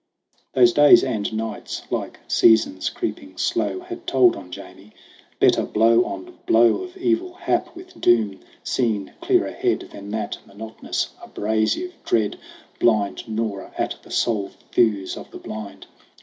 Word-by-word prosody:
Those 120 Hz, -2 st, +5 dB
days 145 Hz, 0 st, +7 dB
and 110 Hz, -5 st, -1 dB
nights, 110 Hz, -1 st, -4 dB
like -, -, -3 dB
seasons 110 Hz, -4 st, +4 dB
creeping 350 Hz, -, -5 dB
slow, 370 Hz, -, -1 dB
Had 355 Hz, -1 st, -9 dB
told 355 Hz, +1 st, +4 dB
on 90 Hz, -, -10 dB
Jamie. 95 Hz, +3 st, -11 dB, 0.5 s
Better -, -, +4 dB
blow 115 Hz, +2 st, +4 dB
on 95 Hz, -1 st, -8 dB
blow 115 Hz, +1 st, +5 dB
Of 365 Hz, 0 st, -9 dB
evil 355 Hz, 0 st, 0 dB
hap, 350 Hz, -1 st, -1 dB
with 365 Hz, 0 st, -13 dB
doom 110 Hz, -5 st, +3 dB, 0.2 s
seen 110 Hz, -6 st, -1 dB
clear 365 Hz, +1 st, +3 dB
ahead, 370 Hz, -2 st, -1 dB
Than 100 Hz, 0 st, -9 dB
that 110 Hz, +1 st, -3 dB
monotonous, 110 Hz, +3 st, -4 dB
abrasive 110 Hz, -, -1 dB
dread, 110 Hz, -3 st, 0 dB, 0.4 s
Blind 110 Hz, 0 st, +1 dB
gnawer 110 Hz, -3 st, -3 dB
at -, -, -1 dB
the -, -, -17 dB
soul 105 Hz, -5 st, 0 dB, 0.2 s
thews 105 Hz, -5 st, +2 dB
of -, -, -10 dB
the -, -, -10 dB
blind. 105 Hz, -2 st, -8 dB
115 Hz, 140 wpm, -22 LUFS, -, 0.5 s, days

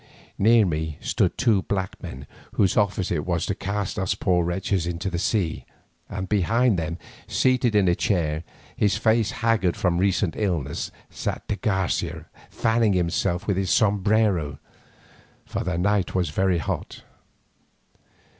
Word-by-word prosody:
Near 110 Hz, +1 st, +5 dB
me 80 Hz, -3 st, -2 dB
stood -, -, 0 dB
two 110 Hz, -7 st, +3 dB
black 95 Hz, -1 st, -3 dB
men 65 Hz, +2 st, -8 dB, 0.3 s
whose 95 Hz, -, +2 dB
office 100 Hz, -3 st, +1 dB
it 75 Hz, -4 st, 0 dB
was 85 Hz, -2 st, -1 dB
to -, -, -1 dB
cast 100 Hz, 0 st, -3 dB
us 95 Hz, +1 st, 0 dB
poor 90 Hz, -3 st, +1 dB
wretches 90 Hz, 0 st, -1 dB
into 90 Hz, +2 st, -3 dB
the 85 Hz, -, -2 dB
sea, 90 Hz, -5 st, 0 dB, 0.5 s
and 95 Hz, -1 st, -4 dB
behind 105 Hz, +2 st, +2 dB
them, 85 Hz, +1 st, -3 dB, 0.3 s
seated 125 Hz, -3 st, +2 dB
in 100 Hz, -3 st, +4 dB
a 85 Hz, -, +4 dB
chair, 85 Hz, -6 st, 0 dB, 0.3 s
his 105 Hz, -1 st, +2 dB
face 110 Hz, -1 st, +2 dB
haggard 115 Hz, -6 st, +1 dB
from 90 Hz, -2 st, +1 dB
recent 95 Hz, -2 st, +1 dB
illness, 85 Hz, -9 st, -2 dB, 0.2 s
sat -, -, -4 dB
de -, -, -1 dB
Garcia 95 Hz, -4 st, -1 dB, 0.2 s
fanning 115 Hz, -2 st, +2 dB
himself 90 Hz, +1 st, 0 dB
with 100 Hz, -3 st, 0 dB
his 95 Hz, -2 st, 0 dB
sombrero, 100 Hz, -7 st, +2 dB, 0.9 s
for -, -, -3 dB
the 90 Hz, -1 st, -2 dB
night 100 Hz, +1 st, +1 dB
was 90 Hz, -5 st, 0 dB
very 95 Hz, +2 st, +2 dB
hot. 80 Hz, -, -4 dB
95 Hz, 145 wpm, -24 LUFS, 85-105 Hz, 0.9 s, Near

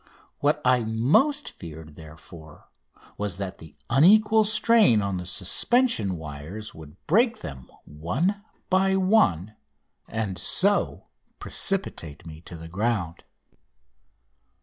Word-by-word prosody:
What 150 Hz, +1 st, 0 dB
I 125 Hz, -1 st, +3 dB
most 140 Hz, -, +1 dB
feared, 80 Hz, -2 st, -11 dB
therefore, 80 Hz, +1 st, -14 dB, 0.5 s
was 100 Hz, -3 st, -3 dB
that 95 Hz, -2 st, -6 dB
the 80 Hz, -2 st, -14 dB
unequal 210 Hz, -, +5 dB
strain 220 Hz, -, +4 dB
on 100 Hz, -2 st, -2 dB
the 90 Hz, -1 st, -5 dB
suspension 100 Hz, -, +1 dB
wires 80 Hz, +7 st, -8 dB
would 80 Hz, +1 st, -13 dB
break 230 Hz, +8 st, +2 dB
them 70 Hz, -6 st, -9 dB, 0.2 s
one 140 Hz, -, -2 dB, 0.3 s
by 190 Hz, +1 st, +3 dB
one 110 Hz, -, +1 dB, 0.5 s
and 100 Hz, -5 st, -4 dB
so 200 Hz, -, +2 dB, 0.3 s
precipitate 85 Hz, -, -3 dB
me 80 Hz, -1 st, -11 dB
to 85 Hz, -, -10 dB
the 80 Hz, 0 st, -10 dB
ground. 95 Hz, -2 st, -2 dB
105 Hz, 110 wpm, -25 LUFS, -, 0.5 s, unequal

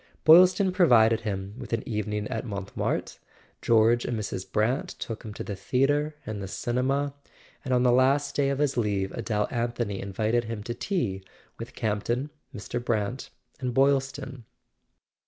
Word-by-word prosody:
Boylston 185 Hz, +4 st, +7 dB
pro¬ 180 Hz, -1 st, +4 dB
vided 115 Hz, -3 st, +5 dB
him 100 Hz, -3 st, -4 dB
with -, -, -7 dB
an 115 Hz, -, -2 dB
evening 105 Hz, -1 st, -2 dB
at 110 Hz, -, -3 dB
Montmartre, 100 Hz, -4 st, -3 dB, 0.4 s
George 115 Hz, +1 st, +4 dB
and 120 Hz, -, -2 dB
Mrs. 95 Hz, -3 st, -5 dB
Brant 125 Hz, -, +1 dB
took 115 Hz, -1 st, -5 dB
him 110 Hz, -, -8 dB
to -, -, -5 dB
the 100 Hz, -, -5 dB
theatre 145 Hz, +9 st, +1 dB
and 110 Hz, -2 st, -5 dB
the 95 Hz, -, -5 dB
cinema, 135 Hz, +7 st, -1 dB, 0.5 s
and 130 Hz, -, -4 dB
on 125 Hz, -1 st, +3 dB
the 125 Hz, -, +5 dB
last 135 Hz, +3 st, +3 dB
day 140 Hz, -1 st, +2 dB
of 140 Hz, -, -1 dB
his 145 Hz, -2 st, 0 dB
leave 100 Hz, -4 st, 0 dB
Adele 105 Hz, -2 st, -1 dB
Anthony 120 Hz, -4 st, -2 dB
invited 110 Hz, +4 st, 0 dB
him 110 Hz, -2 st, -5 dB
to 120 Hz, -, -4 dB
tea 115 Hz, -, -2 dB, 0.4 s
with -, -, -8 dB
Campton, 115 Hz, +6 st, -1 dB, 0.2 s
Mr. 120 Hz, 0 st, -5 dB
Brant 115 Hz, +1 st, -2 dB, 0.3 s
and 125 Hz, -2 st, -3 dB
Boylston. 135 Hz, -2 st, +1 dB
120 Hz, 160 wpm, -27 LUFS, 105-135 Hz, 0.5 s, Boylston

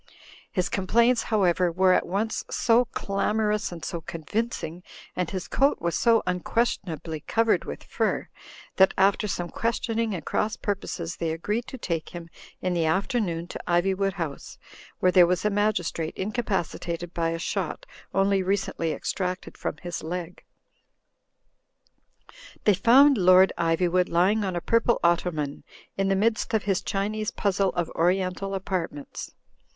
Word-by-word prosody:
His 180 Hz, -3 st, 0 dB
complaints, 235 Hz, +5 st, +2 dB
however, 185 Hz, -5 st, +2 dB
were 185 Hz, +2 st, +4 dB
at -, -, +1 dB
once 210 Hz, +5 st, -1 dB
so 235 Hz, +1 st, +3 dB
clamor 210 Hz, -1 st, -1 dB
ous 210 Hz, -2 st, -1 dB
and 170 Hz, -2 st, -7 dB
so 170 Hz, -, -4 dB
convincing, 170 Hz, +1 st, -4 dB, 0.3 s
and 180 Hz, -2 st, -1 dB
his 185 Hz, -2 st, -4 dB
coat 275 Hz, +1 st, +2 dB
was 170 Hz, 0 st, -1 dB
so 230 Hz, -2 st, +3 dB
unquestion 185 Hz, +4 st, 0 dB
ably 160 Hz, 0 st, -5 dB
covered 225 Hz, +8 st, +1 dB
with -, -, -7 dB
fur, -, -, -1 dB, 0.5 s
that 190 Hz, 0 st, +5 dB
after 195 Hz, +2 st, +3 dB
some 175 Hz, -3 st, -3 dB
questioning 230 Hz, -1 st, -1 dB
and 170 Hz, -, -7 dB
cross 215 Hz, 0 st, 0 dB
purposes 180 Hz, -4 st, -4 dB
they 165 Hz, -, -1 dB
agreed 210 Hz, +9 st, -2 dB
to 260 Hz, -, -7 dB
take 170 Hz, -8 st, -3 dB
him 170 Hz, -1 st, -8 dB, 0.3 s
in 185 Hz, -1 st, 0 dB
the 170 Hz, -2 st, +1 dB
af 190 Hz, +5 st, +1 dB
ternoon 175 Hz, -9 st, -1 dB
to -, -, -6 dB
Ivywood 190 Hz, +2 st, +1 dB
House, 165 Hz, -6 st, -6 dB, 0.4 s
where 185 Hz, -, +3 dB
there 180 Hz, -2 st, +7 dB
was 180 Hz, +2 st, 0 dB
a 210 Hz, -, +3 dB
magis 205 Hz, -4 st, +1 dB
trate 160 Hz, -1 st, -5 dB
incapacitated 180 Hz, -5 st, -3 dB
by 165 Hz, -1 st, 0 dB
a 165 Hz, -, -2 dB
shot 335 Hz, -, -3 dB, 0.3 s
only 195 Hz, 0 st, +2 dB
recently 185 Hz, -4 st, -1 dB
extracted 185 Hz, +2 st, -3 dB
from -, -, -4 dB
his 175 Hz, -1 st, -4 dB
leg. 175 Hz, +1 st, -6 dB, 2.2 s
They 210 Hz, -, +5 dB
found 255 Hz, +7 st, +6 dB
Lord 185 Hz, +1 st, +6 dB
Ivjrwood 175 Hz, +2 st, +1 dB
lying 190 Hz, +6 st, +3 dB
on 190 Hz, -2 st, -2 dB
a 175 Hz, -, -2 dB
purple 230 Hz, +3 st, +2 dB
otto 175 Hz, +1 st, +3 dB
man, 150 Hz, -4 st, -4 dB, 0.3 s
in 195 Hz, 0 st, 0 dB
the 195 Hz, -, +2 dB
midst 220 Hz, +2 st, +1 dB
'of 215 Hz, -, +1 dB
his 195 Hz, -2 st, 0 dB
Qiinese 215 Hz, +2 st, -2 dB
puzzle 200 Hz, -1 st, +1 dB
of 175 Hz, -2 st, -2 dB
oriental 185 Hz, +3 st, 0 dB
apartments. 180 Hz, -7 st, -4 dB
185 Hz, 155 wpm, -26 LUFS, 170-210 Hz, 2.2 s, there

